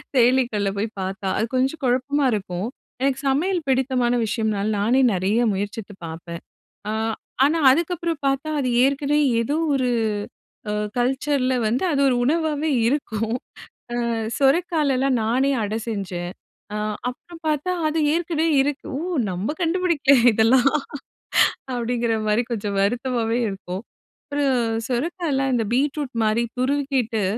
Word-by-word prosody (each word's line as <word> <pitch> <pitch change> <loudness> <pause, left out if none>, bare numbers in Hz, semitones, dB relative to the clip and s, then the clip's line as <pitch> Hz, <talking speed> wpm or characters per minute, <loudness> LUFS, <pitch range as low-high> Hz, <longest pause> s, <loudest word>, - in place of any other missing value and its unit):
செயலிகள்ல 240 -5 +3
போய் 215 +2 -1
பாத்தா. 190 +1 -4
அது 220 - +1
கொஞ்சம் 270 +5 0
கொழப்பமா 265 +3 +1
இருக்கும். 190 -1 -3 0.3
எனக்கு 270 0 +1
சமையல் 345 +6 +1
பிடித்தமான 255 -2 +1
விஷயம்னால, 215 -2 -1
நானே 240 +6 +3
நெறைய 190 +5 +1
முயற்சித்து 205 +1 -4
பாப்பேன். 170 +1 -7 0.5
அ - - 0 0.5
ஆனா, 320 +3 +2
அதுக்கப்புறம் 335 +1 -1
பாத்தா, 275 +3 0
அது 255 - 0
ஏற்கனவே 280 +2 +2 0.2
ஏதோ 285 +6 -1 0.2
ஒரு, 255 -2 +1 0.8
அ - - -1 0.2
கல்ச்சர்ல 260 +1 +1
வந்து 235 +8 0
அது 280 - +1
ஒரு 250 - +2
உணவாவே 315 0 +1 0.2
இருக்கும். 230 -4 -1 0.6
அ - - -1 0.4
சொறக்கால்லாம் 275 -3 +2
நானே 255 +5 +2
அடை 215 +1 -2
செஞ்சேன். 180 -5 -4 0.4
அ - - -2 0.3
அப்புறம் 330 +7 -9
பாத்தா, 305 +4 0 0.2
அது 320 +1 -1 0.2
ஏற்கனவே 330 -1 0
இருக்கு, 285 0 -3
ஓ - - -4 0.3
நம்ம 190 +11 -2
கண்டுபிடிக்கல 330 -5 +3 0.2
இதெல்லாம். 240 +5 +4 1.0
அப்படிங்கிற 235 -1 0
மாரி 215 +3 +2
கொஞ்சம் 205 -3 -2
வருத்தமாவே 235 +1 0
இருக்கும். 190 -1 -6 0.5
ஒரு 290 - +1 0.4
சுரக்காயலாம், 275 +1 -1
இந்த 230 - +1
பீட்ரூட் 285 0 0
மாரி 215 +2 +2 0.2
துருவிக்கிட்டு, 260 -5 0
255 Hz, 125 wpm, -23 LUFS, 220-290 Hz, 1.0 s, இதெல்லாம்